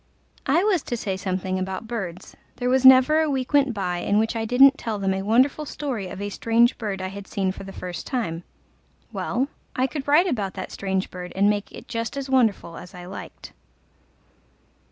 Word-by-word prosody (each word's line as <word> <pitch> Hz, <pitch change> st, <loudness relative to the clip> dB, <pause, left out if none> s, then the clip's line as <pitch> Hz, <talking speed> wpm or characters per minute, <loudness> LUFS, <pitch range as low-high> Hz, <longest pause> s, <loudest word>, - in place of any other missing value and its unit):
I 315 Hz, +7 st, +3 dB
was 400 Hz, -6 st, +2 dB
to 240 Hz, -, -2 dB
say 200 Hz, -4 st, -2 dB
something 185 Hz, 0 st, -2 dB
about 190 Hz, +3 st, -4 dB
birds: 195 Hz, -7 st, -6 dB, 0.2 s
there 250 Hz, 0 st, -1 dB
was 260 Hz, 0 st, +3 dB
never 260 Hz, +4 st, +7 dB
a 315 Hz, -, +1 dB
week 265 Hz, -1 st, -2 dB
went 280 Hz, -2 st, +4 dB
by 185 Hz, -5 st, -2 dB
in 205 Hz, -, +1 dB
which 225 Hz, +2 st, +1 dB
I 225 Hz, -1 st, -1 dB
didn't 265 Hz, +4 st, +6 dB
tell 225 Hz, -3 st, -3 dB
them 195 Hz, -1 st, 0 dB
a 190 Hz, -, -2 dB
wonderful 255 Hz, +9 st, +2 dB
story 265 Hz, -9 st, -4 dB
of 185 Hz, -, -8 dB
a 205 Hz, 0 st, -3 dB
strange 230 Hz, +4 st, +2 dB
bird 200 Hz, -4 st, -3 dB
I 185 Hz, -, -3 dB
had 200 Hz, +1 st, -9 dB
seen 190 Hz, -2 st, -1 dB
for 190 Hz, -, -9 dB
the 195 Hz, -, -8 dB
first 180 Hz, -3 st, -6 dB
time: 175 Hz, -10 st, -2 dB, 0.7 s
well, 260 Hz, +3 st, -1 dB, 0.3 s
I 255 Hz, -, +2 dB
could 270 Hz, +2 st, -5 dB
write 300 Hz, +5 st, +5 dB
about 210 Hz, -, -2 dB
that 190 Hz, -, -6 dB
strange 190 Hz, -1 st, -2 dB
bird 180 Hz, -1 st, -7 dB
and 200 Hz, +2 st, +4 dB
make 205 Hz, -1 st, -3 dB
it -, -, -11 dB
just 230 Hz, +3 st, -4 dB
as 270 Hz, -1 st, -4 dB
wonderful 220 Hz, -9 st, +1 dB
as 180 Hz, +1 st, -11 dB
I 180 Hz, 0 st, -9 dB
liked. 185 Hz, -, -9 dB
220 Hz, 205 wpm, -24 LUFS, 190-260 Hz, 0.7 s, never